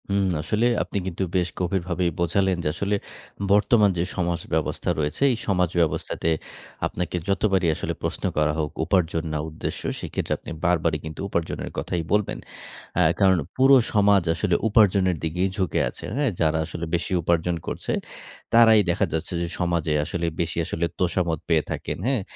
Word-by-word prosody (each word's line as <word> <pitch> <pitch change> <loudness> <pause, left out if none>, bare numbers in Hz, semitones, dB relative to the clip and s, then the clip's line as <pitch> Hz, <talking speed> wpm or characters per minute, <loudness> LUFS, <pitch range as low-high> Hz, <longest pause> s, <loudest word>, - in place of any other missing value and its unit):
উম 100 0 +2 0.2
আসলে 105 +8 0 0.2
আপনি - - -5
কিন্তু 95 +1 -2
বেশ 90 -1 +2
গভীরভাবেই 90 -1 0
বোঝালেন, 95 +2 +2
যে - - -1
আসলে 100 +3 0 0.6
বর্তমান 105 +1 +5
যে 85 - +1
সমাজ 85 -2 0
ব্যবস্থা 80 -1 -1
রয়েছে 75 - -2
এই 120 - -1
সমাজ 90 -4 +2
ব্যবস্থাতে 80 0 -1 0.6
আপনাকে 90 0 -3
যতবারই 95 -2 +2
আসলে - - -3
প্রশ্ন - - -3
করা 75 0 +2
হোক 75 -1 -1
উপার্জন 85 -2 +1
না - - 0
উদ্দেশ্য 80 - -5 0.2
সেক্ষেত্রে - - -3
আপনি - - -9
বারবারই 85 -3 +2
কিন্তু 80 0 -7
উপার্জনের 85 -3 -2
কথাই 85 - -2
বলবেন। 105 0 +1 0.6
অ্যা - - +4 0.2
কারণ 95 -2 +5 0.2
পুরো 135 +1 +6 0.2
সমাজ 100 -3 +4
আসলে 90 +1 0
উপার্জনের 100 -4 +4
দিকেই 90 +4 0
ঝুঁকে 95 -3 0
আছে। - - -12
হ্যাঁ, 140 -3 +1
যারা 80 0 +3
আসলে 85 +2 -5
বেশি 85 - -3
উপার্জন 85 +1 +1
করছে। - - -3 0.6
তারাই 115 -2 +7
দেখা 85 - +2
যাচ্ছে 80 +2 -3
যে 85 - -1
সমাজে 85 -3 0
আসলে 85 +2 -3 0.2
বেশি 85 0 -3
আসলে 85 0 -1
তোষামদ 85 -3 0
পেয়ে 80 -3 +3
থাকেন, - - -3
হ্যাঁ? 130 -5 +1
90 Hz, 160 wpm, -24 LUFS, 85-100 Hz, 0.6 s, তারাই